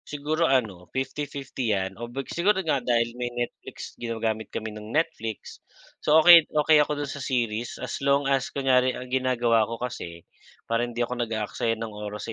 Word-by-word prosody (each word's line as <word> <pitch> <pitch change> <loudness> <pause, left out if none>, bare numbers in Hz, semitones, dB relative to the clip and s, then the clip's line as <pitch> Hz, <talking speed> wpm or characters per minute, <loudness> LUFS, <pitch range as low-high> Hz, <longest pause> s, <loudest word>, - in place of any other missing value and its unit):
siguro 155 +3 -1
ano, 105 -9 0
50/50 135 -2 -3
'yan 95 +2 -4
o 120 - -5
big 135 +2 -5
siguro 190 +4 +2
nga 140 -4 +1
dahil 120 -1 +1
may 120 - -1
Netflix, 120 0 -5
ginagamit 110 -2 -2
kami 110 -1 -5
ng 105 0 -9
Netflix. 115 -9 -2 0.4
So, 150 - +4
okey 170 -2 +9
okey 150 0 +5
ako 145 0 0
dun 140 - -6
sa 140 - -7
series 120 -3 -2
as - - -5
long 140 0 +2
as 135 -1 +1
kunyari 130 -2 +2
ang 125 0 -8
ginagawa 120 -4 +2
ko 115 - -4
kasi 85 -9 -6 0.4
para 115 0 0
hindi 120 0 -1
ako 125 0 -5
nag-aaksaya 115 0 -1
ng 110 -1 -6
oras 105 +2 -6
120 Hz, 175 wpm, -26 LUFS, 115-140 Hz, 0.4 s, okey